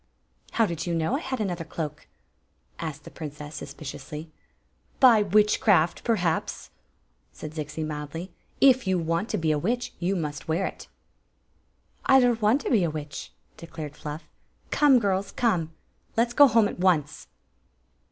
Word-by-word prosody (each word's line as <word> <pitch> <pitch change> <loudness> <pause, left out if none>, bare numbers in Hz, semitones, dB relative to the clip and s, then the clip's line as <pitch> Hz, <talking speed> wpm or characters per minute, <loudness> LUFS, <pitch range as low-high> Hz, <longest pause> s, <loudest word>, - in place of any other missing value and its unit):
" - - -30
How 225 - +3
did 170 -3 -4
you 170 - 0
know 165 +10 0
I - - 0
had 260 -5 -4
another 180 -5 -2
cloak?" 155 -2 -6 0.7
asked 155 -1 -5
the - - -11
princess, 150 -1 -8
suspiciously. 155 +1 -8 0.7
"By 240 -5 +7
witchcraft, 205 -4 +3
perhaps," 180 -8 -1 0.6
said 155 - -8
Zixi, 155 0 -4
mildly. 155 +4 -6 0.3
"If 260 -5 +5
you 190 -1 +2
want 165 +5 -1
to - - -1
be 160 -2 +1
a 150 - +1
witch 245 +8 -2
you 185 +3 0
must 150 -4 -4
wear 165 +4 0
k" - - -14 1.2
"I 265 - +7
don't 240 -2 +2
want 220 +7 +3
to - - -3
be 215 -7 +4
a 170 - +1
witch," 145 -3 -7 0.3
declared 155 -3 -8
Fluff. 150 +1 -7 0.3
" - - -37
Come, 290 -3 +5
girls, 195 -3 0
come; 180 -10 0 0.5
let 235 +1 +3
's - - -8
go 285 +3 +8
home 225 -3 +4
at - - -7
once." 170 -6 +1
175 Hz, 160 wpm, -26 LUFS, 155-220 Hz, 1.2 s, go